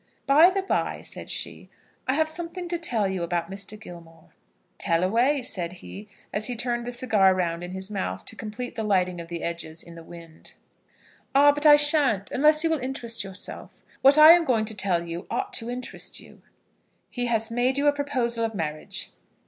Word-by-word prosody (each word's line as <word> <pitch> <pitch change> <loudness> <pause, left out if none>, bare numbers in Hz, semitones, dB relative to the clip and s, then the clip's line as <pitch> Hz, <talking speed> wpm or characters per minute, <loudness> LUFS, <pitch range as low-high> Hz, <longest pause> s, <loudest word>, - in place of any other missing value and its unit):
"By 300 +6 +7
the 385 0 -2
bye," - - -1
said - - -7
she, - - -4 0.4
"I 260 - +2
have 315 +1 +2
something 340 +3 -4
to 345 -1 -2
tell 235 - +1
you 190 -2 -3
about 170 +1 -2
Mr. 200 +2 -6
Gilmore." 165 -5 -13 0.5
"Tell 165 +1 +1
away," 245 +8 +2
said 180 -8 -3
he, 195 +3 -11 0.3
as 210 +1 +1
he 245 - -3
turned 240 0 -2
the - - -3
cigar 215 -6 +3
round 170 -2 -2
in 175 - -6
his 190 +2 -6
mouth, 95 - -4
to - - -8
complete 225 +3 -6
the 230 - -4
lighting 185 -4 0
of 165 - -10
the 170 0 -6
edges 170 -1 -5
in 170 - -13
the 165 - -11
wind. 165 -1 -13 0.8
"Ah, 290 +1 +7
but 295 +1 +1
I 295 - +10
shan't, 295 -9 +2
unless 305 +3 +4
you 325 - +1
will 320 - +1
interest 250 -4 -3
yourself. 195 -1 -8 0.2
What 275 +2 +6
I 305 +1 +10
am 345 0 +6
going 230 -7 +1
to 220 0 -4
tell 190 -3 0
you 170 +1 -7
ought 390 0 -3
to 230 -8 -2
interest 250 +1 -4
you." - - -16 0.7
"He 245 -1 -2
has 225 -1 0
made 245 +3 +1
you 285 - 0
a 290 - +5
proposal 255 -5 -1
of 225 -1 -2
marriage?" 155 -4 -2
225 Hz, 200 wpm, -25 LUFS, 180-280 Hz, 0.8 s, I